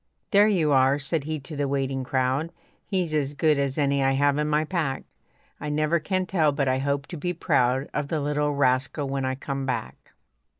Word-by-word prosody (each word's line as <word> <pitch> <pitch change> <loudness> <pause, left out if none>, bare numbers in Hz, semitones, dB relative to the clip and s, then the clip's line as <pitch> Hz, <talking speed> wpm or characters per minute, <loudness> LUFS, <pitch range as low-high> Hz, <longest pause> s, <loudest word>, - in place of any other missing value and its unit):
"There 205 0 +6
you 170 -8 +2
are," 135 0 +4
said 145 +1 -2
he 155 0 -3
to 150 +4 -9
the 145 -1 -1
waiting 135 -1 -1
crowd, 130 +4 0 0.4
"He's 180 -5 -1
as 145 -1 -1
good 150 -1 +2
as 140 -1 -1
any 140 -2 +2
I 135 0 +3
have 145 +1 +2
in 150 - 0
my 150 +1 +1
pack. 155 -6 -2 0.6
I 150 - -4
never 155 +3 +1
can 185 +4 -1
tell, 160 -5 +2
but 140 -1 -1
I 130 0 +1
hope 140 +1 -1
to 175 - -6
be 175 +4 -2
proud 130 -4 +1
Of 150 -1 -2
the 155 +1 -1
little 150 0 0
rascal 135 +1 +1
when 135 0 -2
I 130 0 -1
come 135 0 -4
back." 65 - -5
145 Hz, 210 wpm, -25 LUFS, 135-155 Hz, 0.6 s, There